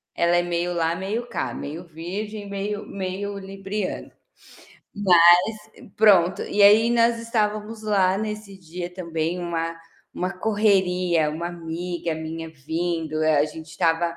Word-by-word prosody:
Ela 170 0 +3
é 175 - +3
meio 175 0 -1
lá, 165 0 +1
meio 205 +6 -3
cá, - - -3
meio 160 +5 -6
virgem, 200 +6 -6
meio 205 +1 -4
meio 200 +1 -4
libriana. 195 0 -5 0.8
Mas, 190 -5 +5 0.8
pronto, 190 -4 +5
e 205 - +1
aí 215 +3 +7
nós 235 0 +3
estávamos 220 -1 -2
lá 195 -3 +2
nesse 210 -1 -5
dia 175 0 -7
também, 170 -1 -3
uma 165 -1 -3 0.4
uma 180 +2 -2
correria, 185 -6 +2
uma 165 +3 -4
amiga 170 0 -4
minha 160 +1 -6
vindo. 160 +1 -3
A 155 -1 +3
a 145 - +4
gente 155 +1 -8
estava, 165 +1 0
180 Hz, 135 wpm, -24 LUFS, 165-205 Hz, 0.8 s, aí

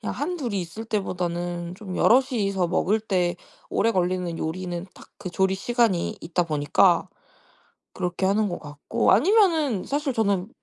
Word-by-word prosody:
그냥 - - -4
1-2 295 - -3
이 195 - 0
있을 180 +6 -7
때보다는 175 -4 -3
좀 190 -2 -7
여럿이서 210 -8 +2
먹을 195 +4 +1
때 180 -5 0 0.3
오래 230 - +2
걸리는 180 -3 -1
요리는 175 +2 -4
딱 - - -15
그 180 - -6
조리 190 +1 +1
시간이 230 -4 +1
있다 170 +1 -1
보니까 155 +4 +2 0.9
그렇게 180 +1 -2
하는 205 +1 +2
것 175 - -4
같고. 145 +10 0
아니면은 325 - +3
사실 285 0 -1
저는 200 -3 0
190 Hz, 300 characters per minute, -24 LUFS, 175-225 Hz, 0.9 s, 아니면은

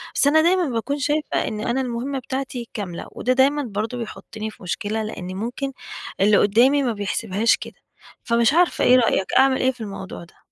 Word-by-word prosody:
بس - - +4
أنا 315 +2 +5
دايمًا 360 +2 +3
باكون 255 +5 -2
شايفة 295 +3 0
إن 215 - -4
أنا 240 +4 -1
المهمّة 255 +2 -3
بتاعتي 260 -2 -5
كاملة، 185 -5 -5
وده 255 - 0
دايمًا 280 +3 +3
برضو 220 +1 -3
بيحطّني 220 -1 -6
في 215 - -17
مشكلة 205 +5 -2
لإن 185 -4 -6
ممكن 245 +7 -3 0.5
اللي 205 +1 +5
قدّامي 250 +8 +4
ما 240 -3 0
بيحسبهاش 205 +1 0
كده، - - -9 0.5
فمش 235 +2 +2
عارفة 350 +1 +3
إيه 250 - +6
رأيك 230 -6 +2
أعمل 265 0 +5
إيه 260 - +3
في 250 -2 -14
الموضوع 195 -4 -7
ده؟ 170 - -19
235 Hz, 185 wpm, -22 LUFS, 215-270 Hz, 0.5 s, إيه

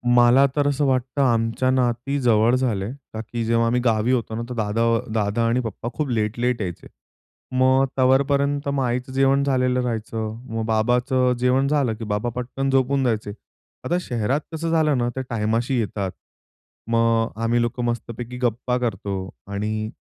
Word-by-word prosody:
मला 120 +3 +6
तर 145 -1 +2
असं 145 0 +1
वाटतं 130 +1 0
आमच्या 115 0 +1
नाती 130 +2 0
जवळ 115 0 +4
झाले. 110 -6 -1 0.2
का 110 - -4
की 115 +1 -4
जेव्हा 115 0 +2
आम्ही 125 +1 +1
गावी 115 +1 +2
होतो 115 -3 -1
ना 115 - -3
तर - - -4
दादा 110 0 -1 0.3
दादा 110 +1 0
आणि 120 +2 +2
पप्पा 115 +1 -5
खूप 150 -3 -2
लेट-लेट 115 +1 0
यायचे. 90 -4 -5 0.6
मग 130 +1 +4
तोपर्यंत 140 +2 +2
मग 140 -1 0
आईचं 125 +1 -2
जेवण 135 +1 +3
झालेलं 125 -2 +1
राहायचं, 110 -2 -3 0.2
मग 115 - -1
बाबाचं 125 +3 +2
जेवण 130 +2 +2
झालं 140 -6 +1
की 115 - -8
बाबा 105 +3 -1
पटकन 130 +2 -3
झोपून 135 0 +2
जायचे. 110 -4 -1 0.5
आता 175 - +1
शहरात 125 0 -1
कसं 165 +1 -2
झालं 155 -4 +2
ना, 120 0 0
त्या 130 - -2
टायमाशी 115 +3 0
येतात. 100 -3 -2 0.8
मग 115 0 +2
आम्ही 120 +1 +2
लोकं 120 +1 -2
मस्तपैकी 120 +1 -4
गप्पा 125 +1 0
करतो 115 -5 -3 0.4
आणि 110 +2 -2
120 Hz, 160 wpm, -23 LUFS, 115-130 Hz, 0.8 s, मला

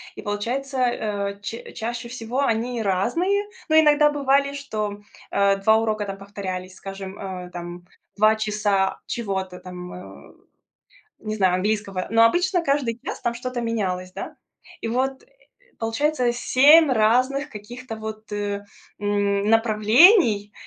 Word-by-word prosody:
И - - -8
получается, 245 +7 -3
э, 205 -5 -1
ча 225 +3 -7
чаще 235 +1 -5
всего 245 +1 -4
они 235 -1 0
разные. 335 - +1 0.3
Но 315 0 +6
иногда 300 -1 +5
бывали, 280 0 +2
что, 215 -8 -4 0.3
э, 200 0 +3
2 220 +3 +4
урока 215 -2 -1
там 195 0 -6
повторялись, 190 -2 -6
скажем, 195 0 -8
э, 185 -2 -6
там, 175 0 -8 0.3
2 215 +1 +5
часа 210 -3 0
чего-то 190 -5 -4
там, 180 -1 -9
э, 180 - -12 0.9
не 215 0 -4
знаю, 185 -3 +2
английского. 195 -1 -2
Но 225 0 +5
обычно 355 - +3
каждый 275 -6 0
час - - -5
там 235 - -1
что-то 245 0 -4
менялось, 185 -6 -2
да. - - -7 0.5
И 225 - -3
вот, 265 +3 -1
э, - - -25 0.5
получается 245 +3 0
7 290 +6 +6
разных 255 +6 +2
каких-то 230 +2 -8
вот, 220 0 -8
э, 205 -1 -3 0.4
м, 205 0 0
направлений. 225 - +5
220 Hz, 135 wpm, -23 LUFS, 200-255 Hz, 0.9 s, Но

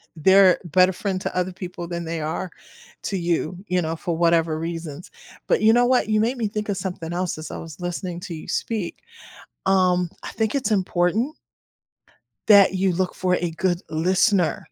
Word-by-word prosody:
they're 190 +3 +6
a - - -9
better 185 +4 +5
friend 190 -1 -3
to - - -4
other 180 0 -1
people 180 -2 -7
than 170 -1 -4
they 165 -1 -4
are 160 +4 -3 0.5
to 200 - -2
you, 170 0 -1
you 180 0 +1
know, 160 0 -2
for 170 -1 -3
whatever 165 -2 +2
reasons, 165 -1 -6 0.3
but - - +1
you 220 +1 +6
know 245 +1 +4
what, 250 -3 +2
you 215 0 +3
made 240 +4 +1
me 225 -3 0
think 210 +1 -4
of 200 -2 -2
something 180 -3 -5
else 180 -2 -2
as 155 - -7
I - - -5
was 165 +1 -10
listening 175 0 -4
to 175 - -6
you 155 - -8
speak, 210 -7 -3 0.6
um, 180 -2 +3
I - - -6
think 220 +3 -1
it's 255 -6 0
important 195 - +1 1.1
that 200 -2 +7
you 190 0 +1
look 185 +1 -1
for 180 -1 +1
a 175 -1 -1
good 175 +1 0
listener. 180 +3 +2
180 Hz, 190 wpm, -23 LUFS, 170-195 Hz, 1.1 s, that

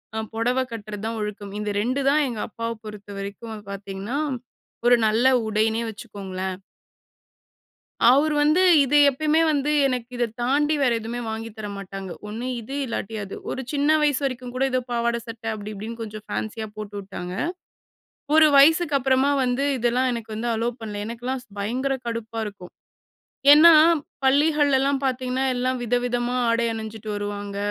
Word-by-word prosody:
அ 220 - -1
பொடவ 245 +3 +1
கட்டுறது 215 -2 -7
தான் 225 0 -3
ஒழுக்கம். 205 -1 -5
இந்த 210 0 -3
2 255 +5 0
தான் 300 +2 +3
எங்கப்பாவ 230 0 -4
பொறுத்தவரைக்கும் 205 +1 -7 0.2
பார்த்தீங்கன்னா, 200 +6 -5 0.7
ஒரு 245 0 +7
நல்ல 225 +4 +3 0.2
உடைன்னே 220 +1 +1
வச்சுக்கோங்களேன். 190 -4 -6 1.5
அவரு 300 +4 +3
வந்து 305 +5 +4 0.2
இது 285 +2 +3
எப்பயுமே 310 +4 +1
வந்து 295 0 +1 0.2
எனக்கு 250 -2 -3
இத 240 0 +1 0.2
தாண்டி 295 +5 +2
வேற 250 -3 +3
எதுவுமே 230 +2 -5
வாங்கி 225 +1 -4
தர 215 -1 -5
மாட்டாங்க. 195 -1 -7 0.2
ஒண்ணு 230 +4 -5
இது 265 +5 -7
இல்லாட்டி 225 -2 -4
அது. 195 - -7
ஒரு 265 - -3
சின்ன 290 0 +1
வயசு 290 -2 +2
வரைக்கும் 255 -1 -4
கூட 265 - +1
ஏதோ 255 - +2
பாவாட, 235 0 0
சட்ட 225 -1 -9
அப்படி 210 0 -6
இப்படின்னு 225 +3 -7
கொஞ்சம் 215 -1 -7
ஃபேன்ஷியா 220 0 -4
போட்டுவிட்டாங்க. 200 -3 -6 1.0
ஒரு 315 -1 +8
வயசுக்கு 315 +2 +5
அப்புறமா 265 +1 +2
வந்து 250 +2 0
இதெல்லாம் 245 +2 +1
எனக்கு 230 -2 -6
வந்து 235 +2 -2
அலோ 230 +2 0
பண்ணல. 210 -2 -5
எனக்கெல்லாம் 245 +3 -4 0.2
பயங்கர 255 +7 -1
கடுப்பா 230 -1 -4
இருக்கும். 200 -4 -9 0.8
ஏன்னா, 320 +3 +9 0.5
பள்ளிகள்ளெல்லா 280 0 +3
பார்த்தீங்கன்னா, 255 0 -1
எல்லா 250 +1 0
வித, 240 0 0
விதமா 245 0 -1 0.2
ஆடை 230 0 +2
அணிஞ்சிட்டு 220 -1 -6
வருவாங்க. 205 -1 -4
235 Hz, 145 wpm, -24 LUFS, 210-265 Hz, 1.5 s, ஏன்னா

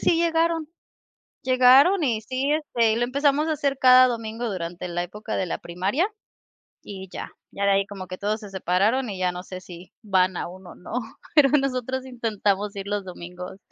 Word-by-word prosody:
sí 340 - +3
llegaron. 330 -1 +1 0.8
Llegaron 260 +8 +6
y 235 -6 +1
sí, 260 +5 -2
este, 265 -7 +1
y - - 0
lo 240 - +1
empezamos 280 +4 +1
a 315 - +1
hacer 280 -2 -1
cada 255 0 +8
domingo 230 -1 -4
durante 175 -1 -5
la 175 0 -2
época 210 +5 -6
de 190 - 0
la 170 - -3
primaria, 195 - -1 0.8
y 190 -1 -9
ya, - - -6 0.2
ya 200 - -3
de 200 - +4
ahí 195 0 +2
como 195 -3 -8
que 185 - -7
todos 210 +2 -1
se 205 -3 -10
separaron 200 +7 +1
y 195 - -6
ya 185 -1 +1
no 180 0 -6
sé 185 0 -8
si 180 -1 -12
van 185 -3 +2
aún 185 +2 -6
o - - -11
no, - - -12 0.4
pero 290 -3 +6
nosotros 260 -2 0
intentamos 210 -4 -1
ir 195 0 -5
los 205 -1 -2
domingos. 180 0 -9
215 Hz, 190 wpm, -24 LUFS, 185-260 Hz, 0.8 s, cada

